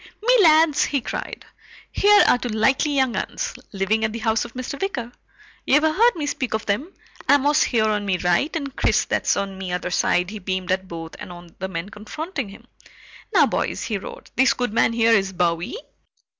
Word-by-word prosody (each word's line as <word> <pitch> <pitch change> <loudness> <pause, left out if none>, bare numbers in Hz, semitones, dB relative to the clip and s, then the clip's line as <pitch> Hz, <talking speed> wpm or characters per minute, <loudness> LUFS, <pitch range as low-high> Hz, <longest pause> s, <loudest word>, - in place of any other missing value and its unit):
"Me - - +4
lads!" 315 -3 +5
he 280 - 0
cried, 250 - -6 0.5
"Here 415 +1 +5
are 245 - +4
two 245 - -4
likely 265 +7 +1
young 265 -3 +1
'uns, - - -3 0.2
living 205 +3 0
at 220 - 0
the 230 - -5
house 220 0 +2
of 235 - -12
Mr. 255 +2 -6
Wicker. 250 - -3 0.5
Ye've 295 +3 +3
heard 425 +10 +3
me 310 -4 -3
speak 275 -5 -2
of 220 - -4
them. 245 - -2 0.4
Amos, 285 +1 +4
here, 225 -3 +2
on 210 -1 0
me 195 -2 0
right, 180 - +1
and 280 -4 -4
Chris, - - +2
that's - - 0
on 195 -1 -4
me 185 -2 -5
other 180 0 -3
side." 180 0 +1
He 215 - -7
beamed 185 -1 -3
at 190 0 -1
both 165 -2 -8
and - - -8
on 175 -1 -13
the 190 - -3
men 170 +1 -5
confronting 220 - -6
him. 195 - -14 0.7
"Now - - +5
boys," - - -2
he 215 -4 -2
roared, - - -10
"this 245 -2 +4
good 245 -4 -2
man 225 - +3
here 230 0 +3
is 195 -3 +2
Bowie." 175 - -1
220 Hz, 200 wpm, -22 LUFS, 190-280 Hz, 0.7 s, lads